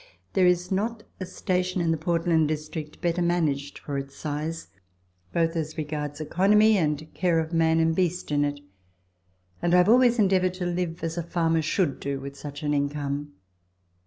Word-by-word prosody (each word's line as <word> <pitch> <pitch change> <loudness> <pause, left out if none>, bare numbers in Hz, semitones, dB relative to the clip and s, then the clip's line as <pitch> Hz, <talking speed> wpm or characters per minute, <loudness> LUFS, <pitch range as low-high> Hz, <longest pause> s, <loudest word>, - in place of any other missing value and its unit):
There 185 -2 +4
is 180 +1 +1
not 215 +3 -1 0.2
a 185 - -4
station 185 0 -1
in 170 -1 +1
the - - +2
Portland 165 0 +1
District 155 0 -5
better 175 0 0
managed 155 -5 0
for 140 -2 -4
its 135 0 -8
size, 155 +2 -4 0.6
both 165 0 +1
as 155 0 -3
regards 150 -1 -4
economy 210 +7 +4
and 155 -3 -1
care 175 -3 +1
of 160 +1 -3
man 165 0 +3
and 160 0 +2
beast 180 -2 -1
in 145 0 +2
it, 145 0 -2 1.0
and 175 +1 +3
I - - +7
have 180 +2 +5
always 245 0 +5
endeavoured 185 -3 +2
to 185 -1 -3
live 175 -1 -2
as 165 +1 -2
a - - -2
farmer 165 -1 +1
should 155 -1 0
do 140 -1 -3
with 140 +1 -8
such 145 +1 -8
an 150 0 0
income. 145 0 -2
165 Hz, 180 wpm, -26 LUFS, 150-180 Hz, 1.0 s, I